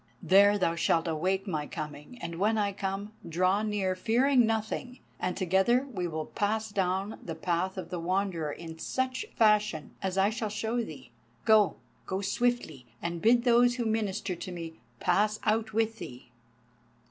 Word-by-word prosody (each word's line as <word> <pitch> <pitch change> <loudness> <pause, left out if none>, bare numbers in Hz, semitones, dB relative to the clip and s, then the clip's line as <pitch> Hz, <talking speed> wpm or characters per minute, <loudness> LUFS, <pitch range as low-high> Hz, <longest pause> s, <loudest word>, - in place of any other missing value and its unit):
There 200 +2 +6
thou 175 -4 +1
shalt 165 0 +1
await 185 +5 0
my 155 -7 -2
coming, 150 +9 -7
and 170 0 -5
when 215 +3 +2
I 205 -1 +1
come, 195 +2 -4 0.2
draw 185 +4 +2
near, 205 -3 0
fearing 245 +4 +3
nothing; 225 +3 -2 0.2
and 180 - -2
together 190 +8 +3
we 180 -3 -2
will 155 -2 -3
pass 215 +1 -1
down 195 +1 -1
the 165 - -6
path 180 +3 -1
of 175 -2 -6
the 180 - -3
Wanderer 175 -3 -1
in 160 +1 -8
such 260 +6 -2
fashion 210 -7 +2
as 190 0 -2
I 195 +2 +4
shall 220 -1 -3
show 220 +3 -1
thee. 135 - -10 0.3
Go! 210 -7 +5 0.3
go 190 - -1
swiftly, 200 - -1
and 170 0 -4
bid 235 +2 +5
those 240 0 +5
who 240 -2 -2
minister 210 -3 -1
to 185 - -7
me 165 -2 -7 0.2
pass 210 +4 +2
out 220 0 +1
with 225 +1 0
thee." 125 -6 -9
195 Hz, 165 wpm, -29 LUFS, 170-220 Hz, 0.3 s, There